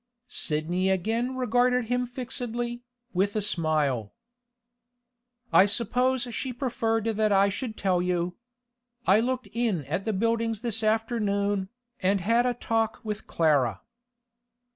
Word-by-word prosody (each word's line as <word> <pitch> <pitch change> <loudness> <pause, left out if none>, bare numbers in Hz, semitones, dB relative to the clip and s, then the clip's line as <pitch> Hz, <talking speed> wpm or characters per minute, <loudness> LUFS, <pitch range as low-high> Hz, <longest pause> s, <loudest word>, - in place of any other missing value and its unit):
Sidney 175 +5 0
again 225 +7 0
regarded 250 0 +2
him 245 +2 0
fixedly, 240 -1 -4 0.3
with 195 +3 +1
a - - +2
smile. 150 - 0 1.4
'I 195 - +7
suppose 245 +4 +1
she 260 +3 -3
preferred 230 -3 -1
that 215 -1 +1
I 200 0 +5
should 220 +2 -4
tell 185 -3 +1
you. 180 0 -1 0.7
I 195 +3 +5
looked 255 +2 -1
in 220 - 0
at 165 +8 -3
the 220 - 0
Buildings 230 +1 0
this 230 -2 -2
afternoon, 205 -3 0 0.3
and 195 +1 +2
had 230 +6 +2
a 245 - 0
talk 225 -1 -1
with 210 -2 -5
Clara. 135 - +2
220 Hz, 125 wpm, -27 LUFS, 190-240 Hz, 1.4 s, I